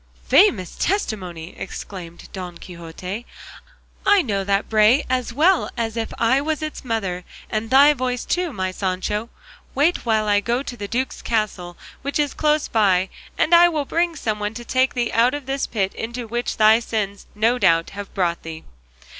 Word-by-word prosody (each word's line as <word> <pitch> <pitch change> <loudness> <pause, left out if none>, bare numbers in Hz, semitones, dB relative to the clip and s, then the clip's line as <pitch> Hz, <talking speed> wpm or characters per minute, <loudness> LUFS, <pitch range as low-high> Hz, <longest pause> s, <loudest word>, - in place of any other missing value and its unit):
"Famous 200 - +4
testimony!" 185 - -2
exclaimed 180 -3 -8
Don 180 -3 -6
Quixote; 180 +5 -7 0.8
"I 405 -1 +5
know 200 -7 -1
that 200 +1 0
bray 220 +5 +4
as 255 -2 0
well 325 +9 +3
as 225 -1 -2
if 225 -1 -3
I 245 +4 +3
was 310 +1 -2
its 310 - -5
mother, 195 -7 -2 0.3
and 220 0 -2
thy 280 +3 +7
voice 250 -2 -2
too, 355 -2 -1
my 185 -5 -2
Sancho. 195 +4 -2 0.5
Wait 305 +6 +2
while 220 -2 +1
I 205 -1 +4
go 235 +6 -1
to 250 - -6
the 205 -3 -6
duke's 255 +5 -2
castle, 200 -6 -2 0.2
which 280 +1 -2
is 295 -2 0
close 300 0 +1
by, 190 -4 +2 0.3
and 340 - +2
I 345 +1 +8
will 305 -4 -2
bring 335 +3 0
some 215 -7 -2
one 210 +1 -3
to 240 0 -7
take 260 +2 +1
thee 240 -1 0
out 240 +4 +3
of 290 -2 -6
this 270 +1 -2
pit 195 -4 -1
into 235 +1 -5
which 240 +2 -3
thy 220 +1 +6
sins 210 -4 -3
no 230 +4 +2
doubt 165 -5 +3
have 200 0 -8
brought 175 -3 0
thee." 160 -1 -8
225 Hz, 180 wpm, -22 LUFS, 195-265 Hz, 0.8 s, I